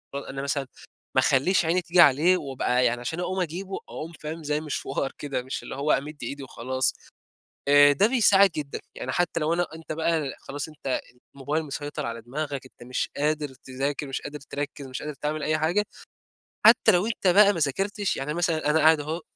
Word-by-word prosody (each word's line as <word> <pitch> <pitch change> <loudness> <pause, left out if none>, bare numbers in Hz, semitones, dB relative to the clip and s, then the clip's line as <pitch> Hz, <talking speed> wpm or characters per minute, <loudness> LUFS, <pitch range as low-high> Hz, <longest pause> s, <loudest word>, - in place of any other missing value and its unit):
أو - - -1
أنا 135 -1 -6
مثلًا 140 0 -2 0.5
ما - - +6
أخلّيش 170 +7 +3
عيني 170 +3 +2
تيجي 175 0 +4
عليه 165 +5 +5
وأبقى 130 -4 0
يعني 120 0 +1
عشان 160 +7 -4
أقوم 185 +1 -1
أجيبه، 185 +3 -4
أقوم 160 +2 -6
فاهم؟ 155 +2 -6
زي 150 0 -1
مشوار 140 -3 -3
كده، 135 -4 -3
مش 130 - -5
اللي - - -7
هو 145 +3 0
أمِد 150 +2 -1
إيدي 140 0 -5
وخلاص. 130 0 -1 0.8
آآ 145 0 +7
ده 170 +9 +4
بيساعد 205 -5 +5
جدًا، 150 -3 -5
يعني 130 - -4
حتى 175 +1 0
لو 155 +2 +1
أنا 175 0 +1
أنت 160 -1 -7
بقى، 160 -3 -1
خلاص 145 +1 -6
أنت 140 -4 -3 0.3
الموبايل 145 +4 -2
مسيطر 145 0 -5
على 115 0 -5
دماغك، 140 +3 -4
أنت 130 - -18
مش 125 - -2
قادر 150 +1 0
تذاكر، 135 +3 -4
مش 135 0 -4
قادر 145 +1 -6
تركِّز، 145 0 -6
مش 130 -1 -6
قادر 150 0 -5
تعمل 150 +2 -3
أي 155 +1 +1
حاجة، 175 +7 +1 0.8
حتى 220 - +7
لو 180 0 +2
أنت 220 -3 -1
بقى 200 +3 +6
ما 170 - -3
ذاكرتش، 195 +8 -1
يعني 140 +2 -3
مثلًا 165 -3 0
أنا 155 +1 +3
قاعد 160 0 +6
أهو 155 +4 -4
150 Hz, 195 wpm, -26 LUFS, 140-170 Hz, 0.8 s, آآ